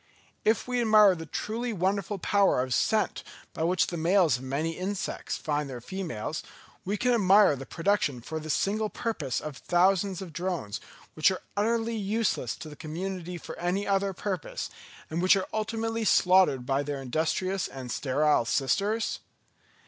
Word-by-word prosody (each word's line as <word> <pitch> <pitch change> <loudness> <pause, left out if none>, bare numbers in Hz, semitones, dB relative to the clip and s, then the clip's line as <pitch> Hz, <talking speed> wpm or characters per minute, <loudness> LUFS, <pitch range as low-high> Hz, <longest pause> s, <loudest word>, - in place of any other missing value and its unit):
If 220 +2 +2
we 250 -1 0
admire 215 -3 +6
the 165 -2 -7
truly 235 +7 -3
wonderful 195 +1 -1
power 195 -7 +3
of 130 -1 -2
scent 220 -1 +1 0.3
by - - -5
which 175 +3 +2
the 175 - -4
males 170 -4 +3
of 125 - -11
many 140 +5 -1
insects 190 +4 -3
find 150 -2 -2
their 125 -2 -6
females, 160 - -4
can - - -18 0.6
we 250 - +5
admire 200 -6 +5
the 135 0 -8
production 170 -7 0
for 160 +7 -5
this 155 -1 -1
single 215 +2 0
purpose 170 - -2
of 150 -3 -7
thousands 185 +1 +2
of 180 -4 -8
drones, 170 - -3 0.3
which 155 - +4
are 185 - -4
utterly 225 +2 0
useless 210 - -1
to - - -9
the 150 - -9
community 180 +3 -5
for - - -8
any 180 +4 0
other 195 0 +1
purpose, 190 -2 -4 0.4
and 165 +2 -1
which 185 +2 +6
are 195 - -1
ultimately 225 +1 -2
slaughtered 180 - +4
by 135 +2 +1
their 145 -1 -4
industrious 160 +8 -1
and 130 -2 -7
sterile 145 +1 +2
sisters? 200 - 0
185 Hz, 165 wpm, -28 LUFS, 150-205 Hz, 0.6 s, admire